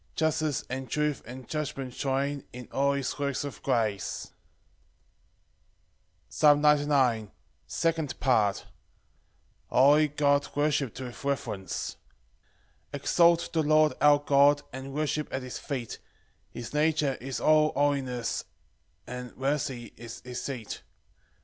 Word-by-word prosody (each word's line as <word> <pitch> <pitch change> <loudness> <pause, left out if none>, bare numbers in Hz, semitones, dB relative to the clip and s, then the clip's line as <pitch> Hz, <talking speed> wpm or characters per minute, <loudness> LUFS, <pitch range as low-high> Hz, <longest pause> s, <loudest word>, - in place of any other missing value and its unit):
Justice, 155 -3 0
and 130 0 -5
truth, 150 +1 0
and 130 +1 -9
judgment 140 -4 -4
join 140 +1 -1
In 125 0 -8
all 140 +1 +2
his 140 0 -3
works 140 -1 -1
of 145 -2 -7
grace. 105 -4 -1 2.0
Psalm 145 - +4
99:2. 145 -7 +3 0.4
Second 165 -3 -1
Part. 110 -6 +2 1.0
A - - -8
holy 145 +4 +6
God 145 -1 +2
worshipped 145 -4 0
with 125 0 -8
reverence. 125 -8 -3 0.9
1 - - -5
Exalt 170 0 +4
the 160 - +2
Lord 155 0 +4
our 150 0 +7
God, 145 0 +4
And 130 +1 -7
worship 150 0 -1
at 130 - -3
his 125 -2 -6
feet; 130 -6 -5 0.5
His 120 +2 -8
nature 150 -2 +2
is 135 0 -4
all 155 0 +4
holiness, 135 -4 0 0.6
And 125 -1 -8
mercy 135 -4 -2
is 115 -1 -9
his 125 0 -5
seat. 125 -6 -5
140 Hz, 120 wpm, -28 LUFS, 125-150 Hz, 2.0 s, our